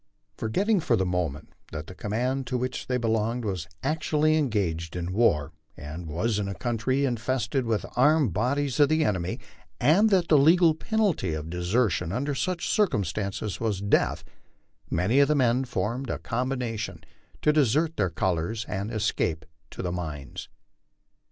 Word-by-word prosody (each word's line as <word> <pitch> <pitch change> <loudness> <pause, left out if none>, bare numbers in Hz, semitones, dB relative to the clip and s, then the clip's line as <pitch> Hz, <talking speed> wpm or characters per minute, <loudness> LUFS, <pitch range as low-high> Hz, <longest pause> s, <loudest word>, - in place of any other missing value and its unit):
Forgetting 200 - +1
for 125 -7 +2
the 95 -3 +1
moment 85 -5 -3 0.2
that 80 -1 -5
the 95 - -10
command 125 +7 -2
to 130 - -1
which 125 +1 -3
they 125 - +1
belonged 115 0 0
was 90 -6 -3 0.2
actually 155 +1 +1
engaged 95 - -1
in 90 +1 -3
war, 80 -8 +2 0.2
and 80 +4 -7
was 105 +8 -1
in 100 - -2
a 100 - -4
country 130 +3 0
in 125 -3 0
fested 130 +2 -1
with 110 -2 0
armed 145 - +4
bodies 140 - 0
of 145 - +6
the 155 0 +2
enemy, 95 -5 -1 0.4
and 175 - +5
that 185 -4 +3
the 150 - +5
legal 165 +3 +5
penalty 175 - 0
of 80 +1 -6
desertion 90 -1 0
under 140 +7 -1
such 175 +5 -2
circumstances 100 - -1
was 110 -4 -1
death, 100 0 +1 0.7
many 90 - +2
of 140 - +6
the 150 - +2
men 130 -1 +2
formed 120 +2 -2
a - - -1
combination 125 -3 -3 0.4
to 150 - +4
desert 155 +3 +2
their 95 -3 +1
colors 90 +6 -1
and 100 +2 -3
escape 100 -7 -1 0.2
to - - -7
the 90 - -2
mines. 75 -6 -6
115 Hz, 160 wpm, -26 LUFS, 90-140 Hz, 0.7 s, of